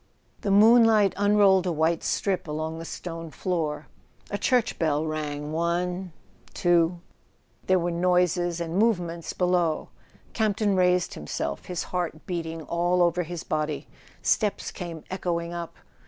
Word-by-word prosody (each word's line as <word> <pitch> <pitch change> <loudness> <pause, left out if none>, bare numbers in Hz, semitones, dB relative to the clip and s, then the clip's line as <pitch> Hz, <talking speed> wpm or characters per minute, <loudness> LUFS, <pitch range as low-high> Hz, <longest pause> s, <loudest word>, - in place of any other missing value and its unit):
The 205 - -2
moonlight 215 0 +6
unrolled 200 -2 +4
a - - +1
white 160 +1 +1
strip 190 -4 -1
along 155 +2 -3
the 165 - -7
stone 165 -1 -6
floor. 155 -3 -2 0.5
A 205 - -1
church 250 -3 +1
bell 155 -1 +1
rang 150 -1 -4
one... 175 +3 -1 0.4
two... 175 0 +2 0.7
there 185 - +4
were 175 0 -1
noises 175 0 +1
and 170 +2 -2
movements 175 -7 0
below. 180 -3 +1 0.4
Campton 210 -2 +1
raised 180 -1 +2
himself, 70 -1 -4
his 180 -2 -3
heart 175 -3 -4
beating 165 -2 -4
all 175 +2 +1
over 175 +1 +2
his 175 0 -5
body. 150 -2 -2 0.4
Steps 210 -3 +1
came 170 -4 -7
echoing 170 -2 -2
up. 170 -1 -6
175 Hz, 135 wpm, -26 LUFS, 160-185 Hz, 0.7 s, moonlight